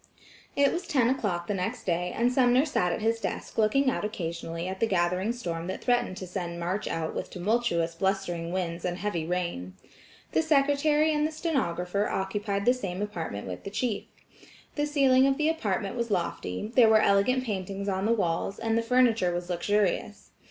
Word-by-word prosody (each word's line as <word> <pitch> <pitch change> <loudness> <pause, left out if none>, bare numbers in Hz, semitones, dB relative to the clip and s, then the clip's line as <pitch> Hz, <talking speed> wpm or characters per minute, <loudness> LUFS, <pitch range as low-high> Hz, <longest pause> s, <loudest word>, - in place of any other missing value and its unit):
It 280 0 +3
was 350 +1 -4
ten 260 -8 +3
o'clock 195 -10 -1
the 205 - -2
next 185 -2 -3
day 180 0 -1
and 240 +2 +1
Sumner 255 +1 +4
sat 180 - 0
at 215 - -3
his 225 +1 +1
desk 210 +1 -4
looking 240 +6 +3
out 260 - +1
occasionally 170 -4 -4
at 190 0 -5
the 230 - +2
gathering 180 +2 +1
storm 170 -8 -4
that 190 - -5
threatened 245 -6 +1
to 190 - -5
send 175 -2 -5
March 180 +4 -2
out 160 -1 -2
with - - -4
tumultuous 180 -4 0
blustering 175 -2 -1
winds 175 -2 -3
and 180 -1 -2
heavy 185 -5 -2
rain. 170 - -3 0.6
The - - +3
secretary 300 0 +3
and 300 0 +2
the - - -6
stenographer 205 - -1
occupied 200 +1 -2
the 245 - +6
same 195 -8 -4
apartment 165 - -5
with 90 -1 -6
the - - -5
chief. 215 0 -2 0.7
The 295 0 -1
ceiling 270 -3 +4
of 270 0 +1
the 310 0 +2
apartment 205 -10 -1
was 235 -1 -2
lofty, 175 - -2
there 235 -3 +7
were 220 0 +6
elegant 200 +6 +3
paintings 195 -3 -4
on 190 0 -1
the - - +2
walls, 195 -3 0
and 225 0 -1
the 230 - +2
furniture 230 -5 +3
was 175 +1 -3
luxurious. 205 +3 -1
200 Hz, 185 wpm, -28 LUFS, 175-245 Hz, 0.7 s, there